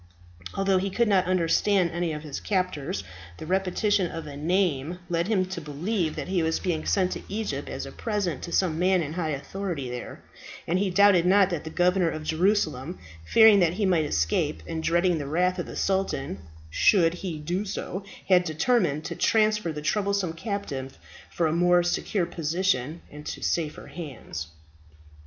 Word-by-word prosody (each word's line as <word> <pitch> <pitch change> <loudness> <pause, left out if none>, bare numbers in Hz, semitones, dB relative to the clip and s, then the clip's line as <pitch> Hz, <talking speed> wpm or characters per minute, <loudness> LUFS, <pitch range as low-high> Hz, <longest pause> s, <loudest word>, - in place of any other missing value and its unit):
Although 195 -1 +2
he 195 +1 -1
could 235 +5 +1
not 190 -3 +3
understand 185 +1 +2
any 175 -1 -1
of 150 0 -5
his 150 -3 -5
captors, 185 - -2 0.3
the - - -8
repetition 190 +1 +1
of 165 -1 -6
a 145 -2 -8
name 165 -1 0
led 170 +1 0
him 200 -4 +2
to 185 -2 -6
believe 160 +4 -2
that - - -5
he 185 -2 +1
was 160 0 0
being 165 -4 -2
sent 185 -2 +2
to - - -4
Egypt 215 +2 -3
as - - -5
a - - -8
present 200 - -2
to 170 - -6
some 165 -4 +1
man 185 -1 +3
in 150 +1 -5
high 165 -2 -2
authority 150 -1 -4
there; 125 0 -7 0.4
and 180 +3 +1
he 200 0 +1
doubted 185 -2 +5
not 195 0 +5
that 165 -3 -3
the - - -4
Governor 180 +1 +2
of 155 -1 -5
Jerusalem, 165 -2 0 0.3
fearing 220 -3 +7
that 175 -2 +3
he 205 +2 0
might 175 -5 +2
escape, 80 - 0
and 160 - -4
dreading 170 +1 +2
the 145 - -4
wrath 180 +4 +1
of 175 - -3
the - - -8
sultan, 190 - -1 0.3
should 165 - +4
he 175 -2 -5
do 175 +6 -2
so, 195 -1 -5 0.2
had 180 -2 +5
determined 160 - +1
to - - -4
transfer 215 -5 +2
the 150 -1 -6
troublesome 200 +1 0
captive 165 - -5 0.4
to 170 - +2
a 155 - +2
more 175 +1 +4
secure 175 +1 0
position 165 -2 -1
and 150 0 -10
to - - -5
safer 155 -3 -1
hands. 130 - -7
175 Hz, 180 wpm, -26 LUFS, 155-195 Hz, 0.4 s, fearing